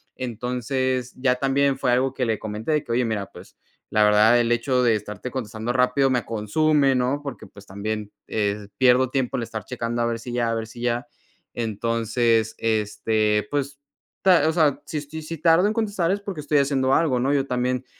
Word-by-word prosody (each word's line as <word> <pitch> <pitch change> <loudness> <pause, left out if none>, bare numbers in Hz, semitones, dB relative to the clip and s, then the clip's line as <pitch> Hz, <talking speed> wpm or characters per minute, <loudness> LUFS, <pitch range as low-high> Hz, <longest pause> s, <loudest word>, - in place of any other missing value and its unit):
Entonces, 125 +1 -2
ya 125 -1 +1
también 135 +1 +1
fue 135 -2 +1
algo 130 +2 +1
que 130 - -1
le 110 -2 -1
comenté 110 +7 -3
de 150 - +1
que: - - -7
"Oye, 120 +1 +2
mira, 105 -3 -2
pues - - -14 0.4
la 110 - +4
verdad 105 +3 +5
el 120 0 +1
hecho 125 +2 +1
de 115 -2 +4
estarte 105 +3 -6
contestando 115 -2 -4
rápido 125 +2 +2
me 125 -2 0
consume", 135 +6 +2
¿no? 130 +3 0
Porque, 135 -8 -7
pues, 100 0 -16
también, 105 +2 -4 0.2
eh, 105 -1 -2
pierdo 130 0 +4
tiempo 130 -3 -1
el 120 - -2
estar 110 -2 -6
checando 120 -1 -3
a 120 - +2
ver 115 -1 -1
si 120 +1 -7
ya, 120 -1 0
a 115 - -1
ver 110 -1 -4
si 120 +1 -11
ya 120 +3 -1 0.5
Entonces, 115 0 0
este, 110 -1 0
pues, 140 -1 -2 0.4
ta 175 -5 +5
o - - 0
sea, 150 -4 +2
si 155 - -5
estoy 150 +2 -6
si 165 +1 -6
tardo 165 +3 +4
en 215 - 0
contestar 205 -6 0
es 200 - 0
porque 195 -6 -5
estoy 145 0 +2
haciendo 135 -1 +1
algo, 150 -6 +2
¿no? 135 +3 +1
Yo 140 -1 +1
también 125 0 -1
125 Hz, 205 wpm, -23 LUFS, 110-140 Hz, 0.5 s, verdad